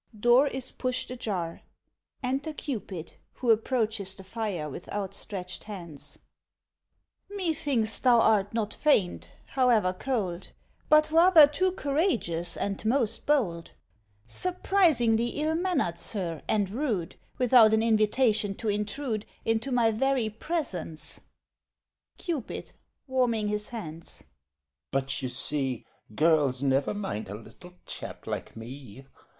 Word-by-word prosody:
[Door 240 +5 +5
is 265 -2 -3
pushed 255 -1 -3
ajar. 190 -9 -4 0.6
Enter 275 +5 -1
CUPID, 205 - -5 0.2
who 240 -3 +1
approaches 220 -4 0
the 195 - -11
fire 190 -6 -3
with 150 +5 -9
outstretched 195 -2 -5
hands.] 175 -8 -9 1.1
MAID 405 - -9
(indignantly) 380 -3 -2 0.3
Methinks 220 -2 +3
thou 245 -3 +5
art 210 -3 +3
not 220 -2 -2
faint, 215 -12 +1 0.2
however 235 -8 +3
cold, 195 -5 -3 0.4
But 305 0 +5
rather 330 -1 +8
too 360 +6 0
courageous, 275 - -1
and 200 -1 -3
most 230 0 +1
bold; 190 - +1 0.5
Surprisingly 285 - +2
ill 310 +1 +1
mannered, 330 - 0
sir, 170 -7 -1
and 205 -3 +1
rude, 215 - -2 0.2
Without 245 -3 +6
an 220 0 +3
invitation 215 -2 +2
to 220 - -3
intrude 210 +2 -2 0.2
Into 225 +4 0
my 235 -3 +3
very 250 -1 +1
presence. 205 - -4 1.0
CUPID 320 - -4 0.3
(warming 245 -6 +1
his 210 0 -2
hands) 165 -8 -8 0.7
But, 135 0 -2
you 130 - -2
see, 135 -2 -2 0.3
Girls 150 -4 +3
never 135 +7 +1
mind 195 - -4
a 100 - -5
little 180 - -13
chap - - -8
like - - -5
me. 130 +1 -10
220 Hz, 120 wpm, -28 LUFS, 180-260 Hz, 1.1 s, rather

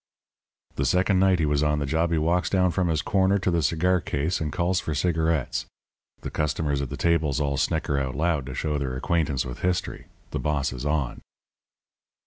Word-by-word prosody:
"The - - +1
second 95 +1 +2
night 95 -1 +4
he 80 - +1
was 75 -1 +1
on 75 0 +2
the 70 - -1
job 80 +5 0
he 85 - +2
walks 85 +3 +1
down 90 -2 +2
from 90 0 0
his 80 -3 0
corner 95 0 +2
to 95 -2 0
the 85 -1 +1
cigar 85 +4 +2
case 80 +4 -1
and 75 -1 -2
calls 90 +2 +1
for 80 - -3
cigarettes. 80 -2 0 0.5
The - - -6
customers 75 -1 -1
at 70 - -4
the - - -5
tables 80 -4 +1
all 70 -2 0
snicker 70 +1 0
out 65 -1 -3
loud 75 -3 0
to 65 - -6
show 75 -2 -1
their 65 -2 -3
acquaintance 75 -3 0
with 60 -1 -7
history. 90 -2 -2 0.2
The - - -2
boss 75 -3 -1
is 65 +3 -4
on. 75 -4 -1
80 Hz, 200 wpm, -25 LUFS, 70-85 Hz, 0.5 s, night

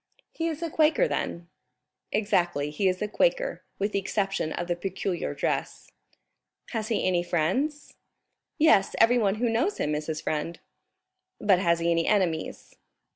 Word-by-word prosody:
"He 330 - -2
is 320 0 -4
a 330 - -3
Quaker 315 +12 +3
then?" 170 0 -3 0.6
"Exactly, 175 -8 +1
he 190 +6 0
is 185 +2 0
a - - -1
Quaker, - - 0 0.2
with 200 +1 -1
the 200 - +1
exception 195 -4 -1
of 175 - -3
the 175 - 0
peculiar 190 0 -3
dress." - - -3 0.8
"Has 220 -3 -2
he 225 - 0
any 180 -2 +2
friends?" 190 - -1 0.6
"Yes, 300 -12 +4
everyone 225 -4 +4
who 240 +3 0
knows 240 - 0
him 150 - -1
is 150 0 -3
his 155 -1 -2
friend." 155 +2 -3 0.8
"But 195 -4 +4
has 170 -3 +2
he 170 0 0
any 165 0 +1
enemies?" 180 -6 -1
195 Hz, 155 wpm, -27 LUFS, 170-240 Hz, 0.8 s, Yes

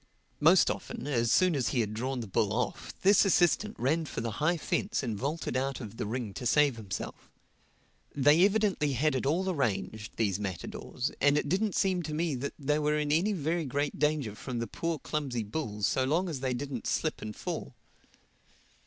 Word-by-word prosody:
Most - - +6
often, - - -6
as 120 -5 +1
soon 185 -3 +4
as 130 -4 0
he 130 - 0
had 105 -1 -2
drawn 125 +3 -2
the 110 - -6
bull 100 +2 +1
off, 125 +2 -2
this 200 +1 +6
assistant 195 +2 +3
ran 155 +6 +1
for - - -5
the 115 0 -2
high 170 +3 +3
fence 195 +5 -1
and 115 -4 -2
vaulted 140 +8 -3
out 135 +1 -1
of 115 -3 -8
the - - -3
ring 115 -2 -3
to 125 - -3
save 145 0 +4
himself. 100 -5 -6 0.9
They 145 +5 +5
evidently 200 -8 +2
had 150 +5 +2
it 130 0 -1
all 175 +6 +1
arranged, 110 - -2
these 100 -4 +1
matadors; 100 - -4
and 145 +1 +5
it 150 - 0
didn't 195 +5 0
seem 185 -2 +2
to 155 -2 -4
me 165 -1 0
that 135 +2 -4
they 150 +1 0
were 150 0 +1
in 150 -1 0
any 180 +8 +2
very 165 -1 -1
great 145 +2 -2
danger 150 -8 +1
from 120 +3 -6
the 115 - -1
poor 165 +8 -3
clumsy 140 -7 -3
bull 105 -2 -4
so 130 - +2
long 165 +8 +1
as 150 -5 -4
they 130 -1 -1
didn't 130 -2 -4
slip 155 - -1
and 105 -1 -6
fall. - - -5
140 Hz, 195 wpm, -30 LUFS, 115-160 Hz, 0.9 s, Most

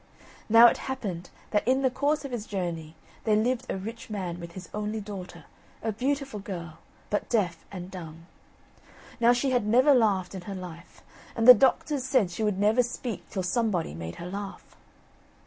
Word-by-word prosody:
Now 230 +2 +9
it 240 - +6
happened 195 -10 -4 0.2
that 210 +1 +1
in 265 +2 +3
the 260 - +3
course 290 +3 0
of 275 - -6
his 230 -3 -4
journey 170 -5 -4 0.3
there 215 -2 +3
lived 245 +3 0
a - - -1
rich 225 +5 -7
man 185 -5 -4
with 170 0 -9
his 185 -2 -9
only 210 +1 -2
daughter, 185 -5 -8 0.4
a 225 - 0
beautiful 270 +1 -2
girl, 170 -5 -7 0.3
but 205 - -1
deaf 185 -8 0
and 185 -1 -7
dumb. 165 -3 -9 0.9
Now 235 0 +6
she 245 +2 +1
had 245 -4 +1
never 255 +6 +5
laughed 205 -8 +2
in 190 - -6
her 195 - -4
life, 175 -2 -10 0.3
and 225 0 +1
the 250 - +14
doctors 270 +2 +2
said 255 -8 +2
she 175 - -5
would 210 -3 +1
never 210 +5 +4
speak 240 -1 -5
till 190 - -3
somebody 185 - 0
made 85 +1 -6
her 170 - -8
laugh. 200 +1 -7
210 Hz, 180 wpm, -27 LUFS, 180-245 Hz, 0.9 s, the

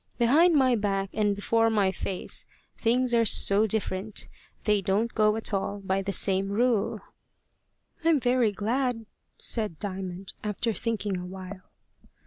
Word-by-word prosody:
Behind 310 +9 +4
my 260 -3 +4
back 195 -2 -1
and 205 -1 +1
before 225 +3 +1
my 205 -4 +2
face 190 -1 -3 0.3
things 245 +1 +1
are 230 -1 +4
so 210 0 +4
different! 205 -1 -2 0.4
They 210 -2 +2
don't 205 +5 0
go 215 -1 +3
at 220 -1 -1
all 200 +1 -2
by 195 0 -1
the 195 +1 -3
same 195 0 +3
rule." 225 0 0 1.0
"I'm 325 -3 +3
very 245 -3 +2
glad," 230 +3 -2 0.3
said 215 -8 -1
Diamond, 190 -1 -6
after 215 +2 -1
thinking 210 -4 -2
a 180 - -7
while. 185 0 -10
210 Hz, 140 wpm, -27 LUFS, 195-230 Hz, 1.0 s, Behind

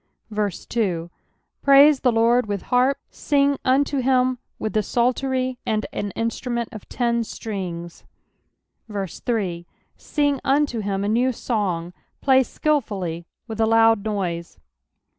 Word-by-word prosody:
2 200 -4 -2 0.5
Praise 280 +1 +7
the 250 - +3
LORD 230 +1 +3
with 205 -1 -3
harp: 255 +3 +4
sing 280 -1 +2
unto 275 +2 +2
him 255 -1 +2 0.2
with 215 - -3
the 215 - +2
psaltery 255 +3 0
arid 215 -1 0
an 205 - -3
instrument 235 +1 -2
of 215 - -10
ten 235 -1 0
strings, 180 -6 -6 0.9
3 195 -3 -3 0.3
Sing 290 -3 0
unto 275 -3 +1
him 200 -1 -2
a - - -1
new 240 +5 +2
song; 185 -8 -2 0.3
play 265 -1 +5
skilfully 200 - -2 0.2
with 225 -1 -4
a 220 - +4
loud 225 -2 +4
noise. 180 -6 -3
225 Hz, 120 wpm, -23 LUFS, 200-255 Hz, 0.9 s, Praise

